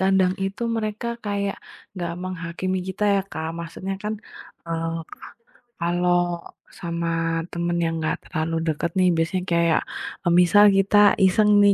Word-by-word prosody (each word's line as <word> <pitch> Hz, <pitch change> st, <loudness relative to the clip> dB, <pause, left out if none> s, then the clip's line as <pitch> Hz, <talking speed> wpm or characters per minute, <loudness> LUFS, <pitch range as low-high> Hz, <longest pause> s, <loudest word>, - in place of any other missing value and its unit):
kadang 190 Hz, -1 st, +3 dB
itu 195 Hz, +4 st, -4 dB
mereka 215 Hz, +1 st, -3 dB, 0.2 s
kayak 200 Hz, -1 st, -1 dB, 0.4 s
enggak 175 Hz, -3 st, -4 dB
menghakimi 185 Hz, +1 st, -3 dB
kita 190 Hz, +3 st, -5 dB
ya, 195 Hz, -, +2 dB
Kak. 160 Hz, +1 st, -4 dB
Maksudnya 170 Hz, +3 st, -5 dB
kan, 210 Hz, -, -2 dB, 0.5 s
e -, -, -12 dB, 0.4 s
ka -, -, -11 dB, 0.5 s
kalau 175 Hz, +1 st, +1 dB, 0.6 s
sama 170 Hz, -1 st, -2 dB, 0.4 s
temen 170 Hz, 0 st, -1 dB
yang 165 Hz, 0 st, -1 dB
enggak 155 Hz, -, -1 dB
terlalu 165 Hz, -1 st, -2 dB
dekat 160 Hz, +2 st, -1 dB
nih, 180 Hz, -1 st, +5 dB
biasanya 180 Hz, +3 st, 0 dB
kayak, 170 Hz, -1 st, +3 dB, 0.4 s
e -, -, 0 dB
misal 205 Hz, +4 st, +6 dB
kita 195 Hz, +2 st, +3 dB, 0.3 s
iseng 210 Hz, +3 st, +4 dB
nih, 200 Hz, 0 st, +6 dB
180 Hz, 145 wpm, -23 LUFS, 170-195 Hz, 0.6 s, misal